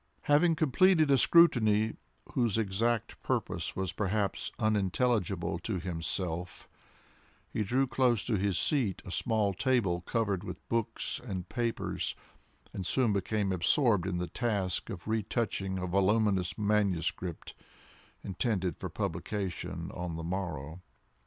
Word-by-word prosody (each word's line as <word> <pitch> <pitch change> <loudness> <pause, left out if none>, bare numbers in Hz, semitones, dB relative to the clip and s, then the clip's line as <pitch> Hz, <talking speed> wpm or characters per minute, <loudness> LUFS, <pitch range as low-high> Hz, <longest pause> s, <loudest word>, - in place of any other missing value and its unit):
Having 155 +3 +4
completed 155 +1 +4
a - - +7
scrutiny 110 -11 +5 0.4
whose 115 -4 +1
exact 115 +2 0
purpose - - -2
was 95 -2 -2
perhaps 100 +1 -1
unintelligible 100 -4 0
to 95 -1 -3
himself, 85 0 -3 0.9
he - - -1
drew 130 +7 +2
close 125 -4 +1
to 115 - +1
his 100 -2 0
seat 130 - 0
a 95 - -7
small 110 -1 +1
table 95 -5 +1
covered 100 -1 -1
with - - -8
books 115 -1 -1
and 95 -7 -5
papers, 120 -2 -2 0.6
and 95 - -4
soon 115 +3 +2
became 100 0 0
absorbed 95 - +2
in 90 -2 -1
the 90 - -1
task 100 -4 -1
of 90 - -7
retouching 110 -3 -1
a 90 - -2
voluminous 95 0 +2
manuscript, 95 -5 -1 0.7
intended 95 - -1
for - - -5
publication 90 -1 -4
on 90 -2 -4
the 80 - -5
morrow. 85 -3 -4
100 Hz, 125 wpm, -31 LUFS, 90-115 Hz, 0.9 s, a